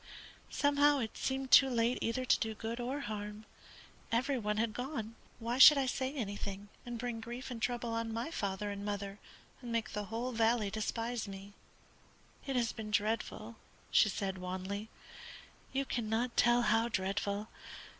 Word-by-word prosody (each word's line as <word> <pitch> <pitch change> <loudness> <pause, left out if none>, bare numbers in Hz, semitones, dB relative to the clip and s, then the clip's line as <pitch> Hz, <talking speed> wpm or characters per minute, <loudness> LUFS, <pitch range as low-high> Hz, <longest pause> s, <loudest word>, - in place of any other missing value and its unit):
Somehow 290 0 +4
it 225 -5 -3
seemed 265 0 -2
too 270 +1 +9
late 235 0 +1
either 255 +3 -1
to - - +4
do 220 -1 -2
good 225 +3 -4
or 260 +4 -2
harm. 210 -1 -5 0.7
Every 255 +3 +1
one 210 -1 -1
had 220 0 0
gone. 245 -3 -4 0.2
Why 235 +2 -2
should 295 +2 +11
I 275 - +2
say 260 +1 -1
anything, 205 -5 -5 0.2
and 240 -1 -4
bring 235 -1 -4
grief 240 +3 -6
and 230 -2 -6
trouble 240 -1 -1
on 230 0 -2
my 230 +7 -3
father 200 - -2
and 200 0 -5
mother, 200 -1 -4 0.4
and 240 -2 -6
make 230 -1 -1
the 210 0 -3
whole 230 +5 -3
valley 225 -2 +2
despise 225 +2 -2
me? 195 +1 -9 0.9
It 270 - -1
has 235 -3 +2
been 220 -1 -7
dreadful," 215 +1 -1 0.3
she 215 - +6
said, 190 -1 -3
wanly. 190 +4 -4 0.8
"You 275 +1 0
cannot 235 0 -1
tell 240 0 +4
how 225 +1 +3
dreadful. 200 0 -2
230 Hz, 165 wpm, -34 LUFS, 210-245 Hz, 0.9 s, should